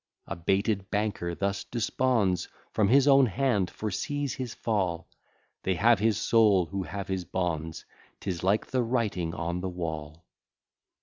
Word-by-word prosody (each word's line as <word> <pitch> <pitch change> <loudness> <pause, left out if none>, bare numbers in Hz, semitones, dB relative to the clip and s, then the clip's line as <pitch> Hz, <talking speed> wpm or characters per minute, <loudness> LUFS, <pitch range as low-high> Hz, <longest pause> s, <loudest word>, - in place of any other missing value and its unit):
A - - -5
baited 95 +3 0
banker 100 -5 -1
thus 100 +1 -1
desponds, 115 -5 0 0.2
From 105 - +2
his 135 +5 +5
own 135 -2 +7
hand 115 -4 +1
foresees 140 - -3
his 130 -3 -5
fall, 95 -7 -1 0.5
They 95 - 0
have 115 +2 +4
his 110 -1 +2
soul, 105 -6 +4
who 95 +3 -4
have 100 +1 -5
his 95 -1 -2
bonds; 80 -3 -3 0.3
'Tis 90 -4 -3
like 100 +3 +2
the 130 - 0
writing 110 -9 -1
on 85 +2 -2
the 95 - -2
wall. 80 -2 -5
100 Hz, 145 wpm, -28 LUFS, 90-115 Hz, 0.5 s, own